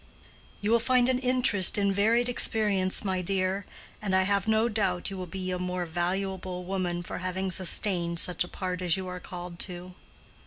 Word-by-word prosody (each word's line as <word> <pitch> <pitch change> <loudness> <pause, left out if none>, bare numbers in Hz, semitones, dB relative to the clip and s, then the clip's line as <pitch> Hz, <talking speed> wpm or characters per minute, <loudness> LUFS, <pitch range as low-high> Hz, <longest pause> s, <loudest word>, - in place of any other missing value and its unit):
"You 205 +2 0
will 235 - +5
find 250 +1 +3
an 255 -1 +1
interest 250 -8 +4
in 200 -1 +2
varied 225 +5 +2
experience, 210 -6 +1
my 190 -1 0
dear, 190 +1 -1 0.3
and 195 -3 0
I 190 - +4
have 200 +1 0
no 220 +1 +3
doubt 195 -5 -1
you - - -5
will 185 -1 -5
be 185 +2 -5
a 180 - -2
more 180 0 -2
valuable 180 +2 -3
woman 180 -2 -2
for - - -6
having 185 +1 -3
sustained 175 -1 +1
such 180 +1 +3
a - - -8
part 185 -1 -4
as 180 0 +1
you 190 -1 -5
are 180 0 -6
called 175 -1 -8
to." 180 -1 -6
185 Hz, 190 wpm, -28 LUFS, 180-205 Hz, 0.3 s, will